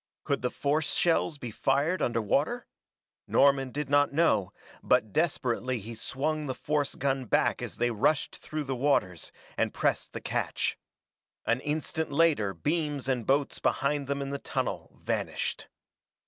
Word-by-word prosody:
Could 140 -2 0
the 125 - 0
force 145 +3 0
shells 165 -2 +2
be 120 -4 -6
fired 140 - +1
under 115 -2 +1
water? 150 - +1 0.6
Norman 135 -1 +4
did 145 +2 -3
not 145 0 +4
know, 140 - +2 0.3
but 105 -2 +2
desperately 130 -6 0
he 110 +3 -7
swung 150 +6 -2
the 130 - -2
force 145 +1 -1
gun 135 -1 0
back - - +2
as - - -6
they 120 0 +1
rushed 135 +7 +1
through 155 0 -4
the 135 -2 -3
waters, 120 - +1 0.3
and - - +1
pressed - - 0
the - - -4
catch. - - -1 0.7
An 120 +2 +2
instant 155 +2 -2
later 145 -10 +3
beams 150 - -1
and 125 -4 -1
boats 140 +1 +1
behind 140 0 0
them 140 0 -1
in 135 - -5
the 140 - -3
tunnel - - -3
vanished. - - -2
140 Hz, 155 wpm, -29 LUFS, 125-150 Hz, 0.7 s, Norman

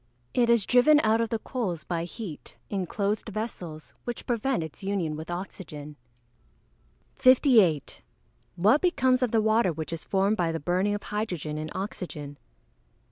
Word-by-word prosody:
_ - - -40 0.3
It 240 -2 +3
is 235 -4 +4
driven 255 +5 +6
out 220 +1 +3
of 230 - -1
the 225 - 0
coals 210 - -3
by 170 -1 -2
heat, 180 -3 -8
in 190 -3 -1
closed 210 +4 -1
vessels, 185 -8 -6
which 240 -1 -5
prevent 240 -3 0
its 160 +4 -9
union 190 -6 -1
with 160 +2 -7
oxygen. 155 -5 -7 1.2
58. 235 - +4 0.6
_What 215 - +5
becomes 260 -8 +3
of 250 - +2
the 220 -1 +2
water 220 -3 +3
which 160 0 -5
is 165 - -5
formed 195 +2 +1
by 170 -2 +1
the 165 - -3
burning 185 +6 +1
of 205 - -6
hydrogen 175 -8 -3
in 155 0 -4
oxygen? 160 -7 -6
195 Hz, 160 wpm, -27 LUFS, 165-230 Hz, 1.2 s, driven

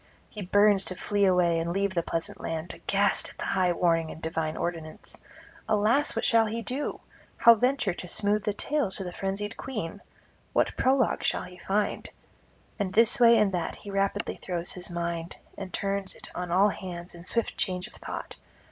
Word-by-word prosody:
He 210 - -7
burns 205 +1 +4
to 185 - -1
flee 200 +2 +1
away 180 -3 +3
and 165 +1 -2
leave 195 +1 0
the 170 - +1
pleasant 165 0 -3
land, 165 +1 -4
aghast 200 0 +1
at - - -15
the - - -4
high 185 -2 +2
warning 165 -2 +1
and - - -8
divine 160 -1 -2
ordinance. 165 -2 -5 0.5
Alas, 220 +7 +2
what - - 0
shall 225 -2 +4
he 230 +2 -3
do? 265 +5 -3 0.4
how 235 - +8
venture 250 -3 +1
to 180 - -8
smooth 205 +3 0
the 210 - 0
tale 280 +3 0
to 190 +1 -2
the 180 - -5
frenzied 195 +3 -3
queen? 205 -7 -5 0.5
what - - +2
prologue 260 -2 +2
shall - - +1
he 180 0 -11
find? 205 +3 -1 0.7
and 195 -2 -1
this 230 +4 +5
way 235 -1 +7
and 210 -2 +3
that 175 -3 -2
he 205 - -9
rapidly 195 0 -1
throws 175 -1 -3
his 180 -1 -5
mind, 170 0 -3 0.2
and 190 -2 -7
turns 195 -1 -1
it - - -9
on 180 -1 -4
all 190 +4 +4
hands 180 -3 -6
in 170 0 -11
swift 230 +5 +1
change 180 -1 0
of 235 - -12
thought. - - -7
195 Hz, 190 wpm, -28 LUFS, 175-210 Hz, 0.7 s, how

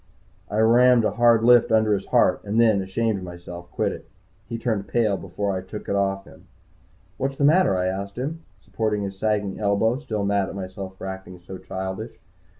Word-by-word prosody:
I 105 - -3
rammed 120 +1 +5
a - - +1
hard 115 0 +4
lift 120 -1 +5
under 110 -1 +3
his 100 -1 -2
heart, - - +3
and 105 +2 -1
then, 110 -4 +4
ashamed 100 +2 -1
of - - -9
myself, 85 0 -9
quit - - 0
it. - - -10 0.4
He 115 - -3
turned 110 -4 -2
pale 105 0 +1
before 95 +1 -3
I 95 - -3
took 100 +3 -9
it - - -1
off 95 0 0
him. - - -17 0.7
"What's 135 +1 -2
the - - -1
matter?" 155 - +4
I 90 - 0
asked 100 +2 -4
him, 150 +6 -4 0.2
supporting 105 +1 -2
his 95 -1 -6
sagging 105 -2 -1
elbow, 110 +4 +1
still 110 -8 -3
mad 100 -1 +1
at - - -8
myself 95 0 -7
for - - -8
acting 95 -1 -7
so 90 +2 -10
childish. 95 0 -6
100 Hz, 200 wpm, -24 LUFS, 95-115 Hz, 0.7 s, rammed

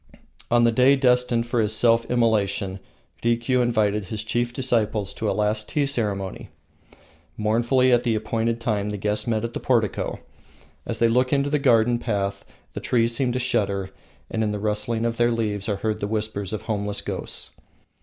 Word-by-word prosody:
On 120 0 +4
the 115 - +5
day 130 +4 +5
destined 125 -3 +2
for 120 -1 0
his 110 0 0
self 115 0 +3
immolation, 100 -5 +1 0.4
Rikiu 120 +2 +2
invited 105 -4 +1
his 105 +3 -5
chief 120 +2 -1
disciples 110 -5 -1
to 110 - -2
a - - +2
last 105 0 -1
tea 145 -2 +1
ceremony. 105 -8 -3 0.9
Mournfully 120 +4 +2
at 120 - +4
the 120 -3 0
appointed 115 +2 -1
time 105 -3 -1
the 105 - -3
guests 105 +2 -1
met 110 -2 0
at 115 0 -4
the - - -3
portico. 115 -5 0 0.7
As - - -2
they 115 - +4
look 125 +2 +2
into 140 0 +1
the 150 - +2
garden 120 -3 +3
path 100 -4 -2 0.3
the - - -4
trees 115 -1 +1
seem 125 0 +1
to - - -1
shudder, 100 -6 0 0.4
and 110 - 0
in 105 - 0
the 105 - -2
rustling 105 +2 -1
of 115 0 -1
their 120 0 +3
leaves 110 -3 -2
are 105 - +1
heard 110 +2 -2
the 100 - -2
whispers 105 -2 -3
of 110 - -4
homeless 105 -2 -2
ghosts. - - -5
115 Hz, 185 wpm, -24 LUFS, 105-120 Hz, 0.9 s, the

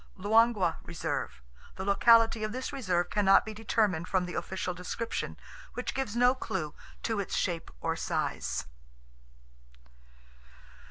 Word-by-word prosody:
Luangwa 205 -3 +3
Reserve.—The - - -6
locality 225 +2 +5
of 215 - -1
this 255 +3 -4
reserve 180 -9 0
cannot 195 -2 +5
be 220 - -6
determined 210 -6 0
from 185 -2 +1
the 180 - -6
official 185 -1 -3
description, 180 +6 -4 0.4
which - - -3
gives 265 -5 -2
no 245 +1 +5
clue 155 - -4 0.3
to 225 -2 0
its 200 - -2
shape 170 -2 -1
or - - 0
size. - - -2
200 Hz, 120 wpm, -30 LUFS, 180-230 Hz, 0.4 s, locality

